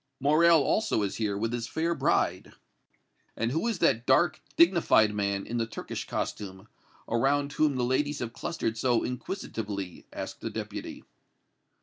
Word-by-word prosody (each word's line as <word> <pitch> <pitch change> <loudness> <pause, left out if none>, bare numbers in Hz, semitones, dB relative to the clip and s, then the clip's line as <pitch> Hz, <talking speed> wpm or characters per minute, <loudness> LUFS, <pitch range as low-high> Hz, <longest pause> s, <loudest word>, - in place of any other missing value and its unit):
Morrel 155 +3 +5
also 210 - +1
is 100 - -3
here 105 -3 -1
with 115 +3 -2
his 120 -1 -3
fair 160 +8 -1
bride." - - 0 0.8
"And 115 +1 0
who 160 - 0
is 225 -4 0
that 115 -6 +2
dark, 155 +4 +3 0.2
dignified 170 - +5
man 100 -1 -1
in 120 - -3
the 115 -1 0
Turkish 115 - -6
costume, 95 0 -4 0.4
around 140 +5 +1
whom 150 -2 +2
the 125 - 0
ladies 145 +4 0
have 120 -3 -5
clustered 110 -1 -3
so 120 -1 +2
inquisitively?" 110 - -5
asked - - -7
the - - -3
Deputy. - - -6
120 Hz, 150 wpm, -28 LUFS, 110-155 Hz, 0.8 s, Morrel